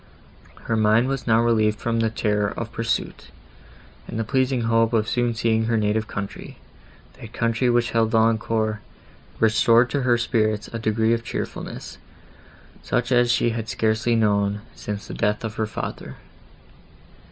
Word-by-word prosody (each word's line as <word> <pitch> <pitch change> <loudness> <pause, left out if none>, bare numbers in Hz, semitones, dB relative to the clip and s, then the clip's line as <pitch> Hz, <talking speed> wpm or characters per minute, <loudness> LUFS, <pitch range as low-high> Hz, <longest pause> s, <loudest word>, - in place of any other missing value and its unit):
Her 115 - -1
mind 110 +3 +3
was 135 -2 -3
now 115 0 +4
relieved 110 -2 +2
from 115 -1 -1
the 115 -1 +2
terror 105 -2 0
of 115 -1 -5
pursuit, 115 0 -3 0.8
and - - -6
the 115 - 0
pleasing 130 +1 0
hope 115 0 +2
of 110 -1 +1
soon 120 -1 0
seeing 115 -1 +1
her 115 0 +1
native 110 +1 0
country—that 100 -1 -10
country 115 +2 0
which 120 0 +1
held 115 -1 +2
Valancourt, 110 -1 +1 0.6
restored 115 +2 +4
to 140 - 0
her 120 -2 +3
spirits 110 -3 0
a 115 - -3
degree 110 +1 +1
of 115 0 -1
cheerfulness, - - -6 0.8
such 120 +1 -1
as 120 -1 +4
she 120 0 +2
had 115 -1 -4
scarcely 110 +1 +1
known, 105 -2 +1
since 105 -1 -6
the - - -8
death 105 +2 -1
of 110 -1 -5
her 110 - 0
father. 105 - -6
115 Hz, 150 wpm, -23 LUFS, 110-115 Hz, 0.8 s, now